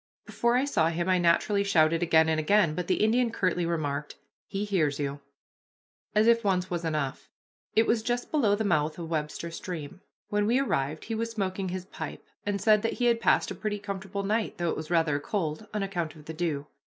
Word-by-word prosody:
Before 235 0 +1
I 255 +2 +3
saw 160 - +2
him 170 +1 -2
I 185 -1 +3
naturally 175 +4 +3
shouted 165 -4 +3
again 160 -2 +4
and 160 -1 +1
again, 170 0 +3
but 180 +1 -3
the 185 - +2
Indian 235 +2 +3
curtly 180 -5 0
remarked, 145 -3 -2 0.3
"He 200 +1 -3
hears 160 -9 +1
you," 140 -1 -3 1.0
as 215 +1 +5
if 230 0 +4
once 185 -2 0
was 170 -1 -2
enough. 150 -4 -2 0.5
It 225 - +5
was 225 0 +2
just 240 +2 -2
below 230 -10 +3
the 220 - -1
mouth 155 -5 +1
of 170 -1 -6
Webster 155 +2 -3
Stream. 165 0 -7 0.3
When 205 0 +1
we 240 +3 +3
arrived 155 - -1
he 225 - -4
was 230 +1 -2
smoking 195 -4 -2
his 185 0 -4
pipe, - - -7 0.2
and 200 -1 0
said 215 -1 +4
that 225 - -1
he 245 - -1
had 235 -1 +3
passed - - +3
a - - -2
pretty 215 -1 -3
comfortable 200 -1 -5
night, 215 +2 -1
though 175 -2 0
it - - -2
was 155 0 -6
rather 165 -4 +2
cold, 165 +3 -3
on 210 -1 -2
account 175 -5 -3
of 150 -1 -14
the 160 - -6
dew. 155 -4 -2
185 Hz, 215 wpm, -28 LUFS, 160-210 Hz, 1.0 s, as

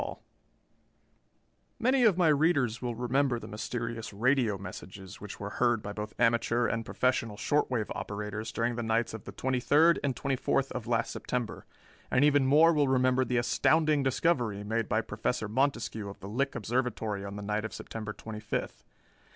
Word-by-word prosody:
_] - - -5 1.6
Many 255 +1 +3
of 200 -5 +4
my 175 -3 +4
readers 145 -7 +2
will 120 -2 -3
remember 125 +2 +1
the - - -8
mysterious 115 +1 -4
radio 115 0 +2
messages 95 -1 -9
which 105 -1 -8
were 100 +1 -5
heard 120 -3 +3
by 100 0 -5
both 105 +1 -6
amateur 115 +1 +2
and 115 0 -1
professional 115 -4 0
short 150 +6 +1
wave 115 -5 -2
operators 105 +2 -5
during 115 +1 -1
the - - -1
nights 115 0 0
of 110 - -8
the - - -7
twenty 130 -1 -1
third 160 +7 +4
and 135 -3 0
twenty 135 -1 -1
fourth 135 +1 0
of 125 -3 -5
last 115 -1 0
September, 125 -3 -4 0.4
and 130 +3 +4
even 145 -2 +4
more 160 +5 +6
will 145 -2 +3
remember 130 0 +3
the 125 0 -1
astounding 155 +5 +3
discovery 130 - +1
made 110 +1 -1
by 110 +2 +2
Professor 110 0 -2
Montescue 115 -3 -1
of 100 - -10
the 95 - -8
Lick 135 +6 -1
Observatory 110 -3 -2
on 100 0 -6
the 105 - -6
night 105 +1 -1
of 110 - -4
September 110 -1 -6
twenty 110 0 -8
fifth. 105 0 -4
120 Hz, 180 wpm, -30 LUFS, 110-135 Hz, 1.6 s, more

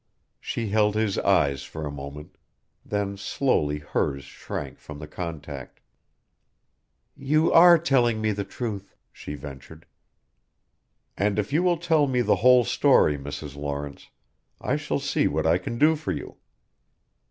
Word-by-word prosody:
She 115 -3 -4
held 105 0 +2
his 110 -2 0
eyes 70 -9 +2
for 80 -1 -7
a 75 - -4
moment, 70 +1 -9 0.5
then 100 -1 -3
slowly 95 - 0
hers 70 -2 -2
shrank 70 - -7
from 75 - -10
the 75 - -8
contact. 75 -4 -7 1.4
"You 155 +4 +1
are 170 +1 +8
telling 125 -8 +2
me 110 0 0
the 100 0 -3
truth," 100 -1 -6 0.2
she 75 - -8
ventured. 75 +3 -11 1.3
"And 100 +1 0
if 105 +5 -2
you 160 - +3
will 180 -1 +2
tell 160 -3 +2
me 125 -2 +1
the - - +2
whole 125 +1 +6
story, 75 -7 +3
Mrs. 70 0 -7
Lawrence 70 0 -6 0.5
I - - -1
shall - - -2
see - - 0
what - - -1
I - - +3
can 115 - -5
do 155 +5 +4
for 155 - -4
you." - - -7
100 Hz, 145 wpm, -25 LUFS, -, 1.4 s, are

